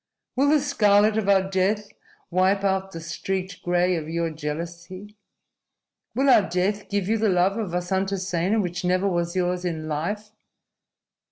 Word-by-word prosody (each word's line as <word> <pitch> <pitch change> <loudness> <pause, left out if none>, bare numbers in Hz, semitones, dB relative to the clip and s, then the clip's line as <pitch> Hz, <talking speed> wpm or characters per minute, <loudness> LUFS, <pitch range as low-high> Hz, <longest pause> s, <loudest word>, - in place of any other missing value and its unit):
Will 275 +3 +3
the 305 0 +5
scarlet 210 -7 +3
of 215 -2 0
our 190 -1 +4
death 195 +2 0 0.4
wipe 190 +2 +2
out 190 0 0
the 165 - -7
streaked 185 +3 -4
gray 180 +1 +1
of 160 -2 -4
your 165 0 -1
jealousy? 170 +6 -6 1.0
Will 270 +2 +2
our 215 -7 +5
death 190 +4 -1
give 200 -2 -1
you 225 +1 +1
the 220 -1 +2
love 185 +1 +2
of 215 -4 -3
Vasantasena, 190 +2 -1
which 175 -2 -2
never 185 +2 +1
was 175 -1 -1
yours 180 0 0
in 160 -3 -3
life? 205 +8 -3
190 Hz, 155 wpm, -24 LUFS, 175-205 Hz, 1.0 s, the